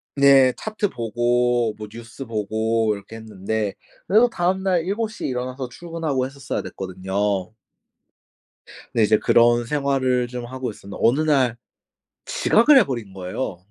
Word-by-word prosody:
네. 135 -2 +6
차트 215 -2 -2
보고 120 0 +1
뭐 105 -1 -7
뉴스 115 +4 -9
보고 110 0 0
이렇게 100 +3 -11
했는데 110 -1 -3 0.3
그래도 225 +5 +5
다음 185 0 0
날 180 -4 +1
7 210 +5 -2
시에 210 - -5
일어나서 125 0 -4
출근하고 160 -3 -3
했었어야 135 0 -4
됐거든요. 95 +1 -3 1.4
네. 115 - +3
이제 110 +1 +4
그런 120 0 +4
생활을 130 -3 0
좀 120 -1 -6
하고 130 -1 -5
있었는데 100 -1 -11
어느 130 +7 +4
날 135 -6 +2 0.7
지각을 300 - +4
해 - - +7
버린 115 -8 -5
거예요. 95 +1 -4
120 Hz, 295 characters per minute, -22 LUFS, 110-140 Hz, 1.4 s, 해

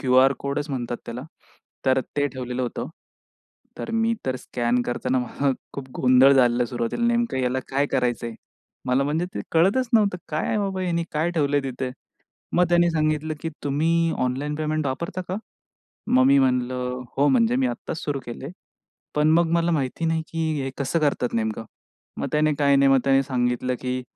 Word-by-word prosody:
QR 130 +1 +5
कोडच 145 +2 -3
म्हणतात 120 -2 -3
त्याला 120 +2 -5 0.6
तर 130 0 +4 0.2
ते 145 0 +2
ठेवलेलं 125 -1 -4
होतं. 120 0 -3 0.9
तर - - -5
मी 225 0 +2
तर 130 - 0
स्कॅन 120 -1 -1
करताना 125 +1 -1
मला 135 +3 -1 0.2
खूप 135 -1 -6
गोंधळ 130 +2 +6
झालं 125 -2 +4
सुरुवातीला 120 - -2
नेमकं 235 - +1
ह्याला 125 0 0
काय 140 +2 +1
करायचंय? 120 -4 -1 0.5
मला 125 +2 +2
म्हणजे 155 +4 0
ते - - -3
कळतच 200 +10 +3
नव्हतं 200 -5 +3
काय 155 0 -1
आहे 215 - +1
बाबा 195 -2 -2
ह्यानी 170 -2 0
काय 155 +3 0
ठेवलंय 145 -3 +1
तिथे? 130 -1 -3 0.7
मग 180 - +5
त्यांनी 175 0 +4
सांगितलं, 155 0 0
की 165 - -2
"तुम्ही 165 +4 +1
ऑनलाईन 140 +4 -2
पेमेंट 155 -1 -1
वापरता 170 +7 -3
का?" 185 - -1 0.7
मग 130 0 +4
मी 140 0 +6
म्हणलं 125 -1 0
हो, 145 +1 +4
म्हणजे 125 -2 +3
मी 130 -1 +2
आत्ताच 120 +6 -4
सुरू 140 -2 -2
केलंय, 125 +4 -6 0.7
पण 150 +1 +3
मग 170 -1 +2
मला 170 0 +2
माहिती 145 +1 -1
नाही 160 0 +1
की 165 -1 -1
हे 135 - -3
कसं 140 +4 0
करतात 140 -5 0
नेमकं? 110 0 -1 0.5
मग - - -1
त्याने 150 0 +2
काय 140 -1 +4
नाही, 135 0 +5
मग 135 - +6
त्याने 135 0 +4
सांगितलं, 125 -1 -1
की 125 0 -2
140 Hz, 175 wpm, -24 LUFS, 125-160 Hz, 0.9 s, गोंधळ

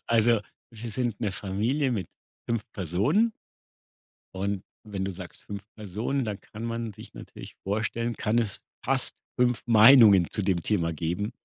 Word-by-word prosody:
Also, 115 -1 +4 0.3
wir 115 +1 -7
sind 120 -1 -2
'ne 105 -4 -1
Familie 115 +9 0
mit 100 -6 -2 0.4
5 115 -2 0
Personen 110 - +2 1.0
und 100 0 -2 0.2
wenn 100 -3 -4
du 95 - -2
sagst 90 -1 -9
5 100 -1 -7
Personen, 110 +6 -2
dann 105 -2 -4
kann 110 +2 -9
man 115 -1 -3
sich 110 +2 -13
natürlich - - -10
vorstellen, 115 +3 -1
kann 110 +2 +1
es 110 -4 -1 0.2
fast - - 0 0.2
5 125 -1 +2
Meinungen 110 -5 +8
zu 105 - -1
dem 95 -3 +1
Thema 85 -5 0
geben. 85 +7 -2
105 Hz, 150 wpm, -27 LUFS, 95-115 Hz, 1.0 s, Meinungen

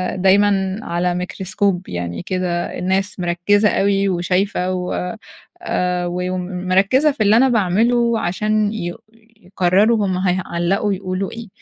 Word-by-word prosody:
دايمًا 195 +1 +2
على 175 +1 -1
ميكروسكوب 185 +1 -2
يعني 85 -1 -4
كده 180 -2 -2
الناس 190 +2 -1
مركزة 180 +4 +2
أوي 195 0 +1
وشايفة 180 +1 0
و 180 +2 -3 0.5
آآ، 180 - -1
و 180 +1 -3
ومركزة 185 +9 +1
في 225 -6 -1
اللي 210 +2 +5
أنا 265 +2 +4
باعمله 230 +2 +2
عشان 215 +3 0
يقو 175 -5 -5 0.4
يقرروا 200 +4 +2
هم 185 -1 -1
هيعلقوا 185 +2 0
يقولوا 185 0 -3
إيه. 230 -1 -8
190 Hz, 125 wpm, -19 LUFS, 180-205 Hz, 0.5 s, اللي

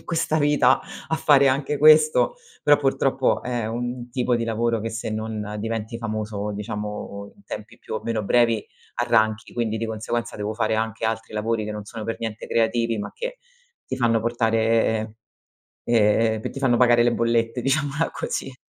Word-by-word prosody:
in - - -21
questa 165 -2 0
vita 145 -3 +4 0.3
a - - +1
fare 140 -3 +5
anche 140 +2 0
questo, 155 - +5 0.3
però 145 -1 +5
purtroppo 135 -1 +1
è 120 -3 -2
un 120 +2 -4
tipo 125 0 0
di 115 -1 0
lavoro 115 0 0
che 115 - -3
se 110 0 -4
non 110 -1 -4
diventi 115 +1 -4
famoso, 105 -2 -3
diciamo 105 0 -6
in 200 - -23
tempi 110 +3 -8
più - - -7
o - - -2
meno 115 -2 -2
brevi, 115 0 +3 0.3
arranchi. 110 -1 +1
Quindi 115 -2 -1
di 115 - -2
conseguenza 115 +2 -3
devo 105 +1 -3
fare 110 0 0
anche 110 0 -2
altri 110 0 -2
lavori 110 +1 -1
che 105 - -4
non 105 -1 -6
sono 110 +1 -8
per 115 - -3
niente 110 -1 -5
creativi, 115 0 +1
ma 105 - -5
che - - -5 0.5
ti - - -4
fanno 115 -3 +2
portare 115 -1 +1 0.7
ehm, 110 -1 +2
che - - -4
ti - - -7
fanno 130 -3 +3
pagare 120 -1 +5
le 120 0 +3
bollette, 115 +1 0
diciamola 145 +3 0
così. 135 - -4
115 Hz, 175 wpm, -23 LUFS, 110-125 Hz, 0.7 s, fare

